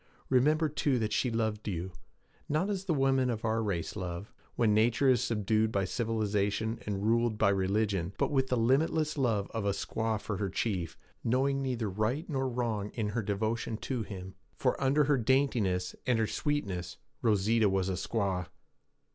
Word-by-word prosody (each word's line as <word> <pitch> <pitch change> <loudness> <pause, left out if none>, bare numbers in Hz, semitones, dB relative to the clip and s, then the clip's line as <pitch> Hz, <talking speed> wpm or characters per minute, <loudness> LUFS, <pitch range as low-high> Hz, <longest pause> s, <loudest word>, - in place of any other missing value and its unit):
Remember, 150 +5 +3
too, 145 -2 0
that 110 -2 -1
she 125 - +1
loved 110 -2 -1
you; 95 -1 -3 0.6
not 175 +8 +1
as 195 -1 -3
the 175 - +1
women 135 -2 +2
of 115 -2 -2
our 110 0 +1
race 100 -6 -2
love, 90 0 -5 0.2
when 110 -3 +3
nature 115 +5 +3
is 125 -4 +4
subdued 110 0 +1
by 100 -2 +1
civilization 110 0 -1
and 100 0 -2
ruled 115 0 +2
by 105 -2 +4
religion, 95 -1 +1
but - - +1
with 135 -2 +2
the 125 - 0
limitless 150 +6 +2
love 115 -8 +1
of 110 -2 -2
a 100 -1 +1
squaw 110 +1 -2
for 105 -1 -4
her 100 0 -1
chief, 95 -4 -2 0.3
knowing 135 +3 +1
neither 125 -5 -1
right 110 - -1
nor 135 -4 -1
wrong 115 -4 -2
in 110 -3 -1
her 115 +2 -1
devotion 110 +2 -2
to 125 +1 -3
him. 95 -3 -7 0.2
For - - +1
under 140 +2 +4
her 145 0 +3
daintiness 110 -8 +1
and 125 -2 +3
her 110 - +2
sweetness 100 - -2 0.2
Rosita 110 0 +3
was 95 -1 0
a 95 - 0
squaw.' 95 -2 -1
110 Hz, 175 wpm, -31 LUFS, 100-130 Hz, 0.6 s, is